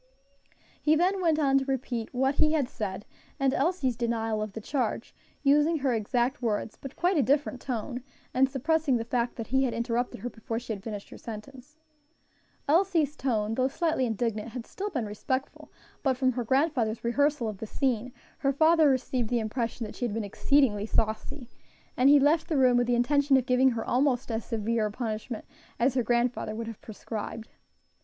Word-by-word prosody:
He 310 +1 +4
then 370 +4 +2
went 325 -3 +3
on 275 -3 +3
to 270 - -4
repeat 250 -4 -3
what 265 +2 +1
he 305 +2 +3
had 290 -5 +1
said, 205 -4 -5 0.3
and 270 -1 +2
Elsie's 275 -4 +1
denial 225 -2 -1
of 215 -2 -4
the 225 - -5
charge, 255 +4 -2 0.3
using 295 +3 +4
her 270 -3 0
exact 240 +4 0
words, 220 -2 -1
but 275 0 -10
quite 355 +1 +1
a - - +5
different 270 0 +1
tone, 250 0 -4 0.3
and 265 +1 +3
suppressing 285 0 +1
the 230 - -3
fact 240 0 -1
that 230 - -5
he 265 +4 +2
had 245 - -2
interrupted 240 +1 -2
her 245 - -3
before 225 0 -5
she 235 -1 -4
had 200 - -7
finished 205 -1 -6
her - - -10
sentence. 255 +6 -10 0.9
Elsie's 325 -2 +2
tone, 220 -5 -1
though 255 +3 +2
slightly 315 -2 0
indignant, 225 0 -2
had 245 -2 -5
still 405 +2 -5
been 255 - -2
respectful, 260 +6 -4 0.3
but 265 -3 +1
from 260 -1 +2
her 245 0 -3
grandfather's 260 -3 +1
rehearsal 285 +1 +1
of 210 -3 -5
the 220 - -5
scene 250 -1 -1 0.3
her 275 - +2
father 315 +2 +5
received 255 -3 0
the 245 - +1
impression 230 +1 -2
that 210 - -8
she 245 - -2
had 220 -3 -3
been 225 - -1
exceedingly 215 -1 +2
saucy, 225 +5 -2 0.5
and 255 +2 +5
he 290 0 +8
left 305 +4 +3
the 320 -4 0
room 255 -2 +5
with 245 0 +2
the 245 - +2
intention 275 +3 +3
of 255 - 0
giving 255 +1 +4
her 230 -3 -3
almost 255 -1 +1
as 225 0 -2
severe 225 0 -1
a - - -6
punishment 220 0 -4 0.3
as 245 +2 +3
her 255 - +2
grandfather 235 -2 0
would 230 +1 -4
have 225 -2 -8
prescribed. 220 +1 -6
250 Hz, 195 wpm, -28 LUFS, 225-275 Hz, 0.9 s, he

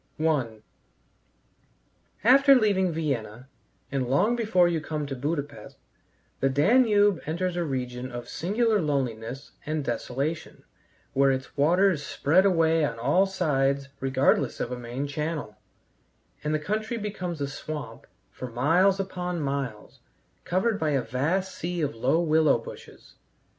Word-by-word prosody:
I 135 -9 0 1.6
After 275 +4 +7
leaving 200 -6 +2
Vienna, 130 -7 -3 0.4
and 130 -3 -1
long 200 - +3
before 215 -7 +3
you 165 -2 -1
come 155 -1 -3
to 140 -1 -5
Buda 145 +3 -1
Pesth, 145 0 -13 0.6
the 135 - +2
Danube 205 - +4
enters 175 +3 -1
a 175 - 0
region 130 -3 -4
of 120 0 -7
singular 215 +4 0
loneliness 135 -3 -3
and 155 -1 -2
desolation, 135 +6 -3 0.5
where 135 0 +4
its 130 0 -4
waters 175 +3 +3
spread 175 +7 +2
away 165 -3 +3
on 115 -6 -1
all 145 +12 +2
sides 140 -6 0
regardless 135 0 +1
of 120 - -3
a 125 - -4
main 120 +4 -4
channel, 150 -6 -4 0.9
and 150 - -1
the 155 - +2
country 215 +8 -3
becomes 185 -6 -4
a 140 - -1
swamp 150 +1 -7 0.2
for 130 - -7
miles 170 +11 +3
upon 180 -2 -3
miles, 135 -7 -4 0.5
covered 195 +5 0
by 155 - 0
a 140 -3 +1
vast 165 +10 -1
sea 175 0 -4
of 145 - -1
low 130 +8 +1
willow 160 -2 +3
bushes. - - -12
155 Hz, 135 wpm, -26 LUFS, 135-185 Hz, 1.6 s, After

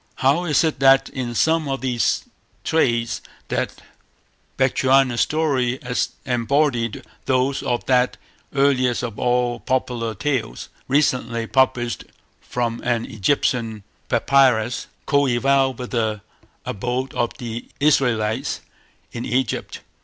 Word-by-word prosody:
How 140 +7 +2
is 155 0 +3
it 155 -4 0
that 135 0 +5
in 120 -3 -4
some 160 +3 +2
of 135 -1 -3
its 120 -2 +1 0.4
traits 120 -7 +1 0.3
that - - -3 0.7
Bechuana 130 -1 +3
story 135 -5 +1 0.5
embodies 125 -1 0 0.2
those 130 +1 +1
of 120 -1 -2
that 125 -1 +2 0.3
earliest 130 -3 +2
of 115 -4 -5
all 125 -1 +1
popular 120 -1 -1
tales, 130 - -2 0.2
recently 125 -5 +1
published 120 -2 +1 0.3
from 120 -1 -3
an 120 -2 0
Egyptian 115 -2 0 0.3
Papyrus, 125 -4 +3 0.2
coeval 135 -1 +2
with 125 0 -7
the 110 -3 -1 0.4
abode 125 +5 -3
of 120 - -1
the 120 -3 -6
Israelites 125 -4 +1 0.5
in 120 - -5
Egypt? 125 -1 -2
125 Hz, 110 wpm, -22 LUFS, 120-135 Hz, 0.7 s, that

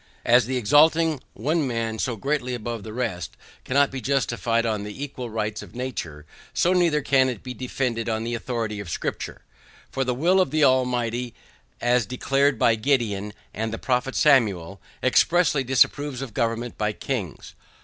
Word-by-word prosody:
As 120 -1 +5
the 130 0 -1
exalting 155 +5 +4
one 155 0 0
man 115 -2 -2
so 125 - -1
greatly 125 +1 -2
above 115 -1 -5
the 110 - -8
rest 105 -8 -4 0.3
cannot 140 +2 +2
be 135 -1 -5
justified 120 -3 0
on 110 -2 -1
the 105 +7 -6
equal 130 -4 -6
rights 105 -1 -3
of - - -13
nature, 85 - -5 0.3
so 180 - +3
neither 170 -5 +2
can 130 -1 +3
it 120 -5 -6
be 125 - -6
defended 125 -2 -2
on 110 0 -1
the 120 +1 -3
authority 115 -3 -3
of 100 -4 -7
scripture; - - -4 0.5
for 135 - -1
the 125 -1 -1
will 180 +8 +3
of 185 - +1
the 155 0 +1
Almighty, 125 -2 +1 0.4
as 120 -2 +2
declared 135 +2 +1
by 115 - +4
Gideon 110 -4 0 0.2
and 110 +1 -3
the 115 - -4
prophet 130 +1 -1
Samuel, 100 - +2 0.2
expressly 165 -5 +3
disapproves 135 +1 +2
of 120 -5 -8
government 115 0 -2
by 105 0 0
kings. 105 - -5
125 Hz, 170 wpm, -24 LUFS, 110-135 Hz, 0.5 s, As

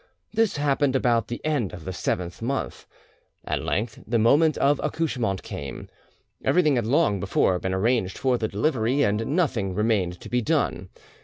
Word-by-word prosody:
This 220 -6 +1
happened 145 -1 +1
about 120 -4 +2
the 120 - -5
end 145 - 0
of 85 -3 -9
the 95 - -4
seventh 90 +1 -3
month. 135 +4 -3 0.6
At - - -2
length 110 +2 -2
the 115 - +1
moment 145 +7 +4
of 140 +1 +2
accouchement 120 - -1
came. 70 -2 -7 0.5
Everything 155 -5 +3
had 120 -3 0
long 140 -6 +2
before 95 -1 +1
been 95 +1 -2
arranged 105 -1 0
for 130 -2 +1
the 110 - 0
delivery, 125 +4 +1
and 110 +7 0
nothing 115 - 0
remained 100 -5 0
to - - -9
be 125 0 0
done. 95 - -1
115 Hz, 165 wpm, -25 LUFS, 95-140 Hz, 0.6 s, moment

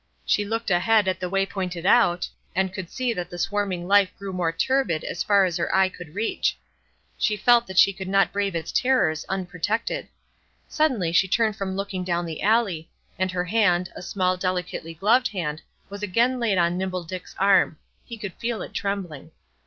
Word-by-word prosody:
She 210 - +2
looked 225 0 -2
ahead 205 +3 +3
at 185 - 0
the 180 - -3
way 195 +1 +1
pointed 185 -3 -5
out, 185 -5 +4 0.3
and 190 0 0
could 190 -3 -6
see 255 -2 -1
that 180 -4 -5
the 175 - -8
swarming 190 -2 -2
life 200 -1 +5
grew 200 -1 -6
more 175 -3 0
turbid 175 -3 0
as - - -4
far 200 -2 +4
as 175 -2 -1
her 170 - -1
eye 190 0 +4
could 175 -3 -12
reach. 225 +2 0 0.6
She 210 -2 +1
felt 235 +3 +4
that 190 - -7
she 200 - +6
could 190 0 -7
not 195 +1 +3
brave 200 -2 -1
its 165 - -3
terrors 250 -12 +2
unprotected. 195 - -2 0.6
Suddenly 255 - +1
she 180 +3 +3
turned 220 +2 +1
from 195 -2 -4
looking 195 -1 -3
down 175 -1 -1
the 160 -2 -6
alley, 200 -7 +1 0.3
and 185 0 +1
her 180 -1 -2
hand, 180 -3 +2
a - - -7
small, 185 0 0
delicately 180 -3 -3
gloved 230 +9 +3
hand, 160 -6 -4 0.3
was 200 +1 -8
again 235 +6 +1
laid 220 -5 +1
on 175 +1 +2
Nimble 185 -1 -2
Dick's 180 +2 -8
arm; 195 -5 +3 0.3
he 235 - -9
could 205 -4 -6
feel 235 -1 -3
it - - -10
trembling. 180 -7 -4
190 Hz, 190 wpm, -24 LUFS, 180-210 Hz, 0.6 s, she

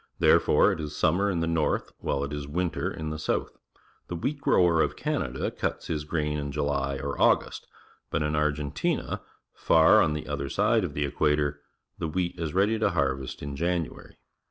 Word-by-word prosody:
Therefore - - +4
it - - -3
is 75 -1 -5
summer 100 +6 +2
in 90 -4 -1
the 85 - 0
north 80 -2 0
while 70 - -1
it 70 +1 -4
is 75 -1 -5
winter 85 +3 -1
in 80 -1 -5
the 80 - -4
sj>utli. 80 - -1 0.6
The 85 - -4
wheat 140 - -3
grower 85 -10 +4
of - - 0
Canada 65 +1 -2
cuts - - -3
his 75 -2 -2
grain 75 -1 -1
in 70 -1 -4
July 70 -2 -1
or 70 +1 -4
August, - - +2 0.4
but - - 0
in 75 0 -1
Argentina, 75 -1 -1 0.3
far 80 -1 +5
on 75 - +2
the 75 - -5
other 70 -2 -3
side 110 +1 +2
of 80 -5 -4
the 75 - 0
equator, 75 0 0 0.4
the 80 - -1
wheat 90 +2 -2
is 80 -1 -3
ready 105 +4 +2
to 105 - +2
han^est 70 -8 -2
in 70 0 -5
January. 85 +1 -3
75 Hz, 185 wpm, -27 LUFS, 70-85 Hz, 0.6 s, far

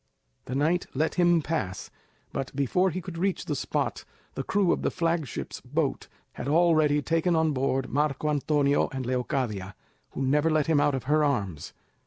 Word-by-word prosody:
The 125 - -4
knight 160 +6 +1
let 155 +4 +1
him 175 -2 +3
pass, 120 - -3 0.4
but 135 0 -4
before 165 +7 +2
he 185 +2 -4
could 170 -2 -7
reach 195 +1 0
the - - -2
spot, - - -2 0.3
the - - -3
crew 200 -4 +2
of - - 0
the - - +1
flagship's 165 -5 -2
boat - - -2 0.3
had 125 - -6
already 155 -2 +3
taken 165 +2 +1
on 160 -1 +2
board 135 -1 0
Marco 150 +1 0
Antonio 145 -1 +2
and 130 -2 -4
Leocadia, 120 -6 -2 0.4
who 135 - -2
never 150 +4 +2
let 155 -2 +2
him 160 -3 +3
out 145 -1 +2
of 130 - -4
her 150 +3 +2
arms. 100 - -2
150 Hz, 175 wpm, -27 LUFS, 135-165 Hz, 0.4 s, him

